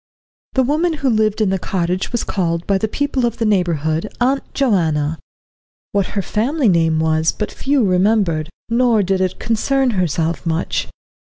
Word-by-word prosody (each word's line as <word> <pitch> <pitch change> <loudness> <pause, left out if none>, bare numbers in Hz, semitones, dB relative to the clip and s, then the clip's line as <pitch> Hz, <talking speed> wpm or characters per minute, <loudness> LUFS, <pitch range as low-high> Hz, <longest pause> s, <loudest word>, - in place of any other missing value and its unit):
The 260 - +3
woman 315 +6 +1
who 280 -4 -1
lived 215 -1 +1
in 205 -3 +2
the 190 - 0
cottage 180 0 -2
was 240 - -1
called 170 -3 -1
by 195 -1 +1
the 220 - 0
people 280 +2 -1
of 235 -1 0
the 230 - -1
neighbourhood 165 -6 0
Aunt 265 +3 0
Joanna. 165 - +1 0.7
What 200 -2 +1
her 200 - +1
family 250 - +1
name 165 -3 +2
was 160 0 +2
but 210 - -4
few 270 -4 +1
remembered, 185 -4 +1 0.2
nor 230 -2 +3
did 190 0 0
it 185 -1 -1
concern 260 +3 +1
herself 165 - -1
much. 165 +1 -1
200 Hz, 165 wpm, -18 LUFS, 170-240 Hz, 0.7 s, The